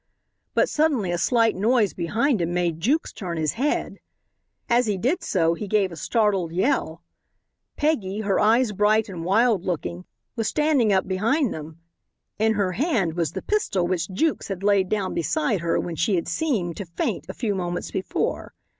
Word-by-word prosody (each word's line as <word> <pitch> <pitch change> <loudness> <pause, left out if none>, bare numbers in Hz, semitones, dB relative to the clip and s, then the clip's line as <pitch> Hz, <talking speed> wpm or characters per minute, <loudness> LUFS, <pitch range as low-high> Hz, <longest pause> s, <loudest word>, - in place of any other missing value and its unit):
But - - +4
suddenly 290 - +1
a 175 - -1
slight 230 +2 +2
noise 215 +1 +2
behind 220 - 0
him 170 +1 -1
made 170 -2 0
Jukes 285 - 0
turn 175 -4 -5
his 155 -2 0
head. 275 +6 -1 0.7
As 240 0 +3
he 205 -2 0
did 260 - 0
so 165 -4 +2
he 205 +4 -5
gave 195 -2 +1
a - - -7
startled 195 -1 0
yell. 175 - 0 0.7
Peggy, 220 -10 0
her 200 -2 +1
eyes 225 +2 +3
bright 210 +2 +2
and 175 -4 -6
wild 210 +1 +3
looking, 90 - -3 0.3
was 225 -1 -1
standing 295 -8 +2
up 190 -1 +2
behind 225 +8 +1
them. 155 +1 -9 0.6
In 220 +1 +3
her 200 -3 0
hand 215 - 0
was 165 -3 -1
the - - -5
pistol 305 - 0
which 175 0 -1
Jukes 310 +12 0
had 195 -1 -5
laid 200 -2 +3
down 200 -3 -1
beside 210 - 0
her 170 0 0
when 170 - -4
she 185 +5 +1
had 170 - -1
seemed 180 - -1
to 200 - -5
faint 170 - -3
a - - -4
few 225 -4 -1
moments 175 -2 -3
before. 190 - -3
200 Hz, 180 wpm, -24 LUFS, 175-230 Hz, 0.7 s, But